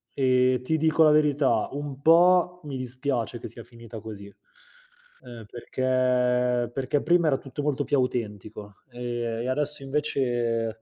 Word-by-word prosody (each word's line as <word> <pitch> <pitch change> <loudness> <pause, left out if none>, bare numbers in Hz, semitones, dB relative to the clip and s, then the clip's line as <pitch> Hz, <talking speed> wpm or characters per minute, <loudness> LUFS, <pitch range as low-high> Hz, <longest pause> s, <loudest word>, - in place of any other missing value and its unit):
ehm, 130 -1 +2
ti 160 +5 -1
dico 160 +1 +3
la 155 - +6
verità: 145 -6 +2
un 140 -1 -6
po' 180 +2 +4
mi 140 -3 -6
dispiace 130 -2 -3
che - - -8
sia 115 - -10
finita 115 -1 -11
così, 105 -2 -9 1.0
ehm, 120 -3 -11
perché 125 0 0
perché 135 +3 -1
prima 170 0 +2
era 135 -3 +2
tutto 135 +2 -7
molto 145 -1 0
più 140 +2 0
autentico, 105 -4 -4 0.2
ehm, 120 0 -10 0.4
e 125 - -3
adesso 145 +1 -1
invece 120 -5 -1
130 Hz, 145 wpm, -25 LUFS, 120-145 Hz, 1.0 s, la